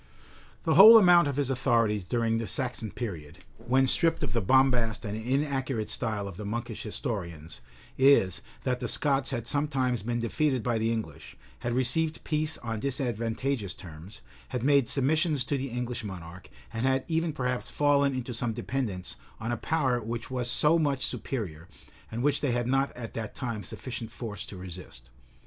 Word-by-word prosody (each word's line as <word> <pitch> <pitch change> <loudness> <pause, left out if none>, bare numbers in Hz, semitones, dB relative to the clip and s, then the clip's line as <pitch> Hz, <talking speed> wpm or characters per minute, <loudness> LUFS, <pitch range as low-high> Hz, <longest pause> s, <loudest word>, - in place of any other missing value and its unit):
The 160 - +2
whole 215 +6 +11
amount 175 -6 +6
of 140 - -2
his 140 -2 0
authorities 115 -6 +1
during 115 +2 0
the 115 - -3
Saxon 125 -5 -2
period, 85 -9 -6 0.2
when 130 +3 +2
stripped 165 +5 +2
of 105 - -2
the 115 - +1
bombast 120 -1 +3
and 105 0 -3
inaccurate 130 0 -1
style 105 -3 -2
of 95 - -8
the 105 - -6
monkish 115 +2 -4
historians, 85 - -5 0.4
is, 130 -10 +5 0.2
that 125 -1 0
the - - -3
Scots 135 -2 +2
had 120 -4 -3
sometimes 130 -3 0
been 120 +3 -2
defeated 130 +1 0
by 120 -2 0
the 115 +1 +1
English, 110 -10 -5 0.2
had 120 - -2
received 160 +5 0
peace 155 0 -1
on 115 -2 -3
disadvantageous 120 - -2
terms, 85 +4 -11 0.2
had 125 -3 -4
made 140 -3 +4
submissions 150 +1 +1
to 140 - -1
the 135 0 -3
English 125 0 -3
monarch, 90 -3 -8 0.2
and 115 +4 0
had 130 0 +2
even 165 0 0
perhaps 125 -4 -2
fallen 140 -2 +2
into 125 -1 -4
some 115 0 -1
dependence 110 -7 -3 0.2
on 110 +2 -3
a - - +1
power 130 -2 0
which 115 +2 -5
was 125 -2 -1
so 155 +6 +4
much 140 -4 0
superior, 90 - -4 0.4
and 115 +2 -4
which 145 0 +2
they 145 - +1
had 120 0 0
not 135 +2 +1
at 115 -2 -7
that 110 -2 -5
time 115 -4 -4
sufficient 115 +4 -6
force 110 -4 -6
to 100 - -9
resist. 90 -8 -10
120 Hz, 175 wpm, -28 LUFS, 110-135 Hz, 0.4 s, whole